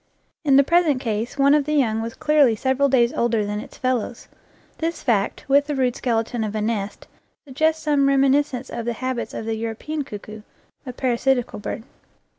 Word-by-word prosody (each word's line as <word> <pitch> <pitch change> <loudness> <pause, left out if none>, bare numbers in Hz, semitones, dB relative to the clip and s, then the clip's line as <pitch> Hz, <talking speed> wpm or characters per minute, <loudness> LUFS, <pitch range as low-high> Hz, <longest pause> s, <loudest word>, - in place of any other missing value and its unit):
In 280 -3 +4
the 280 - +7
present 325 -3 +3
case 230 +1 -3
one 280 +1 +5
of 295 -2 +3
the 300 +1 -1
young 225 -6 +2
was 230 +1 -5
clearly 295 -6 +3
several 265 +4 +1
days 240 -2 +3
older 230 -3 +1
than 205 0 -3
its - - -10
fellows. 255 -2 -2 0.5
This 330 +1 -3
fact, 220 +1 0
with 285 +1 +4
the 295 - -2
rude 255 -2 +1
skeleton 230 -1 -1
of 215 0 -4
a - - 0
nest, 210 -2 -3 0.4
suggests 315 +3 0
some 290 -2 +2
reminiscence 275 -1 +2
of 235 - -4
the 235 - -1
habits 255 +1 -4
of - - -5
the 225 - -1
European 230 +7 -4
cuckoo, 215 -2 -9 0.5
a - - -3
parasitical 250 -1 0
bird. 215 - -5
255 Hz, 185 wpm, -22 LUFS, 225-280 Hz, 0.5 s, the